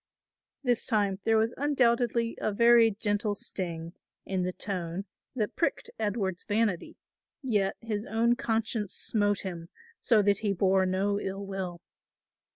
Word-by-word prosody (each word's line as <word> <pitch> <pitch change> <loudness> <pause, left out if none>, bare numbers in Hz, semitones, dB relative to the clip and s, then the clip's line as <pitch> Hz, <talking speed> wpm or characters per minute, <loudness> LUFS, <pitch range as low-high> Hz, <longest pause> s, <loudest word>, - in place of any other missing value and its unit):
This 245 -3 +1
time 205 -5 +1
there 225 0 +4
was 225 +2 +1
undoubtedly 240 -4 +2
a - - 0
very 235 +2 +6
gentle 205 0 -1
sting 170 -7 -4 0.3
in 190 -1 -1
the 180 0 -1
tone 180 -1 -4 0.3
that 215 -4 -2
pricked 335 - -1
Edward's 200 -4 -1
vanity; 210 -4 -1 0.5
yet 205 -6 +1
his 215 -1 -3
own 230 +3 +2
conscience 225 -4 -1
smote 205 -2 +1
him, 170 -3 -6 0.3
so 225 -4 +3
that 200 0 +3
he 210 -2 0
bore 190 0 +3
no 200 +2 0
ill 195 0 -4
will. 185 -3 -5
205 Hz, 140 wpm, -29 LUFS, 190-230 Hz, 0.5 s, very